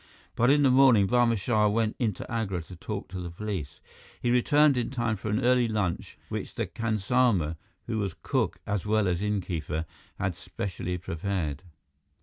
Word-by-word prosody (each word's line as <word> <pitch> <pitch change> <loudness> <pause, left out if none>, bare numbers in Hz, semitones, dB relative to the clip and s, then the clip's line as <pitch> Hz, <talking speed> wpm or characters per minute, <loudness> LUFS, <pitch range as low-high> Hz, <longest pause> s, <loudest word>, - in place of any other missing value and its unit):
But 120 +2 +3
in 145 +1 +5
the 135 - +5
morning, 125 -6 +6
Barma 120 0 +3
Shah 105 +1 +2
went 110 +1 +1
into 110 -7 -1
Agra 100 -7 -2
to 90 - -11
talk 100 +4 -5
to 95 0 -6
the 85 - -5
police. 90 -4 -5 0.4
He 120 - 0
returned 145 +4 +4
in 120 -2 -1
time 120 -4 -1
for 110 +2 -5
an 105 +4 0
early 125 -1 +4
lunch 105 -6 -2
which - - -5
the - - -1
khansama, 110 -6 +1 0.3
who 110 -2 -2
was 100 -5 -2
cook - - 0
as 105 -3 -1
well 105 -1 +2
as 90 0 0
innkeeper, 90 -6 -2 0.3
had 95 -2 -1
specially 90 0 -4
prepared. 85 -4 -3
105 Hz, 170 wpm, -28 LUFS, 90-120 Hz, 0.4 s, morning